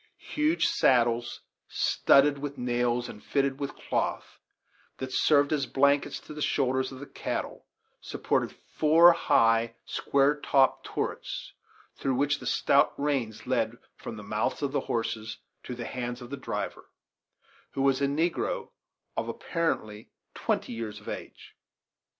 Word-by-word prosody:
Huge 305 +3 +2
saddles, 120 - +2 0.3
studded 140 +1 +3
with 145 0 -5
nails 120 -1 0
and 105 - -10
fitted 140 -1 0
with 140 -1 -4
cloth - - -3 0.6
that 130 -1 -5
served 145 +2 +4
as 140 -3 0
blankets 140 +1 +2
to - - -10
the 150 - -7
shoulders 130 -2 +1
of 130 - -9
the 145 - -7
cattle, - - -5 0.3
supported - - -1
four 165 +3 +5
high, 115 -7 +3
square 140 +1 +1
topped 135 -2 +2
turrets, - - -4 0.5
through 135 -1 0
which 145 +2 +1
the 125 - -7
stout 140 +3 +3
reins 135 -7 -1
led 120 -2 0 0.2
from 110 - -8
the 105 - -8
mouths 105 +7 -2
of 140 - 0
the 145 - +1
horses 110 -1 -2 0.3
to 125 - -5
the 120 - -6
hands 120 -1 -4
of 120 0 -10
the - - -2
driver, 135 - -5 0.8
who 135 - -1
was 135 0 +3
a 140 - +3
negro, 175 - -1 0.4
of - - -2
apparently 110 - -2 0.2
twenty - - -1
years 110 -2 -5
of - - -18
age. - - -8
135 Hz, 145 wpm, -28 LUFS, 120-145 Hz, 0.8 s, four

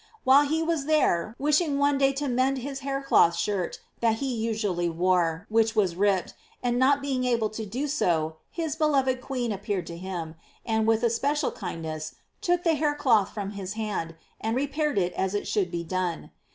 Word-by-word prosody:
While 275 +3 +6
he 320 +2 0
was 325 -4 -1
there, 230 - +2
wishing 300 +1 +2
one 285 0 +2
day 270 0 +4
to 285 +1 -2
mend 260 +2 +1
his 270 +2 -5
hair 275 0 -3
cloth 170 -10 +4
shirt 200 -4 -2 0.2
that 225 -1 +2
he 265 +2 -2
usually 215 -6 -1
wore, 175 0 +1
which 225 +1 +2
was 190 -5 +2
ripped, 195 -1 +1 0.3
and 245 0 +1
not 275 +2 +3
being 265 -2 -1
able 235 -4 +1
to 220 0 -5
do 245 +8 -3
it 295 -1 -1
well, 160 -2 +1
his 320 -3 -3
beloved 270 -5 +2
queen 250 -3 -2
appeared 200 -2 -3
to 170 0 -7
him, 175 -3 -5 0.3
and, 220 -1 +1
with 225 +1 +2
especial 275 +6 +1
kind 165 - -6
ness, 155 -1 -5 0.3
took 355 0 +1
the 330 - +3
hair 295 -1 +1
cloth 225 -9 +3
from 205 -2 -5
his 200 -1 -5
hand, 210 -7 -3 0.2
and 225 +1 -1
re 270 +3 +1
paired 295 -3 -1
it 180 -2 +1
as 190 +1 -1
it 205 - -2
should 195 -4 0
be 170 -1 -3
done. 180 -1 -3
225 Hz, 200 wpm, -26 LUFS, 185-275 Hz, 0.3 s, While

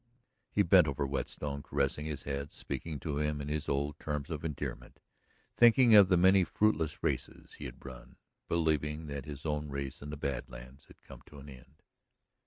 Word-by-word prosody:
He 100 - +2
bent 90 -2 +6
over 70 0 -1
Whetstone, 70 +1 -4
caressing 70 +1 -1
his 75 -3 -5
head, 70 +1 -4
speaking 80 -3 -5
to 75 -3 -3
him 75 0 -1
in 70 0 -5
his 75 -1 -2
old 70 +1 -1
terms 75 +1 -4
of 75 -1 -4
endearment, 70 -5 -5 0.6
thinking 120 0 +6
of 100 -3 +9
the 90 - +4
many 95 +2 +6
fruitless 85 -6 0
races - - -3
he - - -6
had - - -9
run, 65 -2 -11 0.3
believing 80 -2 0
that 70 -2 -6
his 70 -1 -8
own 75 -1 -2
race 70 -1 -5
in 70 - -7
the 75 - -6
Bad 70 -2 -3
Lands 60 +4 -12
had - - -20
come - - -13
to 75 - -13
an 70 +1 -11
end. 65 +2 -16
75 Hz, 190 wpm, -32 LUFS, 70-80 Hz, 0.6 s, of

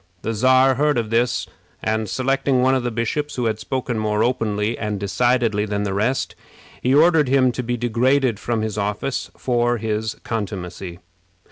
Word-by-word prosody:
The 115 - -1
Czar 130 +4 +4
heard 150 -3 +3
of 115 -2 -2
this; 120 +2 +1 0.4
and, 110 -1 -1
selecting 135 0 +1
one 130 +1 +4
of 130 - +2
the 120 - -2
bishops, 120 +6 -2
who 125 - -1
had 110 -1 -1
spoken 120 0 -3
more 105 0 +1
openly 110 -2 0
and 105 -2 -3
decidedly 110 +2 +1
than 105 0 -2
the 100 -2 -2
rest, 115 +7 0 0.5
he 130 +2 +2
ordered 160 -1 +5
him 130 -1 +4
to 125 - -3
be 120 0 -2
degraded 120 0 +1
from 115 0 -1
his 110 -1 -3
office 105 +6 -2
for 120 -1 +1
his 110 0 -2
contumacy. 95 -5 -5
115 Hz, 170 wpm, -21 LUFS, 105-130 Hz, 0.5 s, ordered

